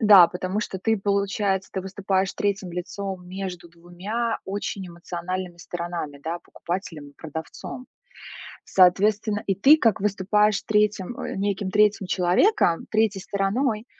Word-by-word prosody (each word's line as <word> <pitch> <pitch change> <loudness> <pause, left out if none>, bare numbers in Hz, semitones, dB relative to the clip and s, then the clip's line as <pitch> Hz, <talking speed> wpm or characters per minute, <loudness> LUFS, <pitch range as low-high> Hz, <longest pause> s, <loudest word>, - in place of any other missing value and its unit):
Да, 205 -5 +9
потому 185 +3 -3
что 195 -2 -4
ты, 225 +4 +1
получается, 200 -1 0
ты 190 - -2
выступаешь 190 0 -1
третьим 200 -3 -2
лицом 185 +1 -5
между 185 -2 -6
2 180 +8 -4
очень 195 -1 -4
эмоциональными 175 +1 -5
сторонами, 170 -4 -5
да, 165 +3 -3
покупателем 170 -4 -6
и - - -22
продавцом. 160 - -7 0.8
Соответственно, 205 +3 +3
и 195 - +2
ты 275 - +7
как 225 -9 +2
выступаешь 210 +1 +2
3 210 0 0
а, - - -4
неким 200 0 -1
3 210 -1 +3
человеком, 180 - +2
третьей 215 -3 +2
стороной, 210 +4 -1
195 Hz, 130 wpm, -24 LUFS, 180-210 Hz, 0.8 s, Да